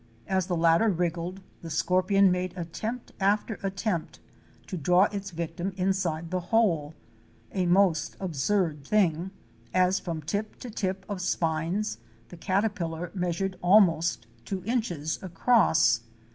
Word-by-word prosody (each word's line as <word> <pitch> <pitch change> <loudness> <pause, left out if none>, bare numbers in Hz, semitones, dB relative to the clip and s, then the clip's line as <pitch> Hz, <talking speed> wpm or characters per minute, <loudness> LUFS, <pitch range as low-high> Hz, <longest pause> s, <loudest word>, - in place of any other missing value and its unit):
As 190 -2 0
the 180 - 0
latter 165 +6 +4
wriggled, 175 +1 -2 0.2
the 165 - -7
scorpion 185 +4 +3
made 180 0 -2
attempt 215 +8 -5
after 205 +2 +1
at 195 -1 -3
tempt 195 -6 -2 0.5
to 190 - -6
draw 180 +3 +4
its 200 -1 -4
victim 170 +2 -4
inside 180 -3 -1
the 185 - 0
hole, 165 -10 +2 0.6
a 185 -2 0
most 175 -3 +2
absurd 165 -2 0
thing, 180 -1 +1 0.5
as 185 +1 +3
from 165 -3 -5
tip 205 +7 -3
to 245 - -7
tip 190 -2 -3
of 200 -3 -4
spines 165 - -1 0.3
the 175 - -11
caterpillar 180 -3 -1
measured 185 +1 -2
almost 175 - +4 0.2
two 185 +7 -4
inches 180 - -2
across. 175 - +3
180 Hz, 130 wpm, -27 LUFS, 165-195 Hz, 0.6 s, latter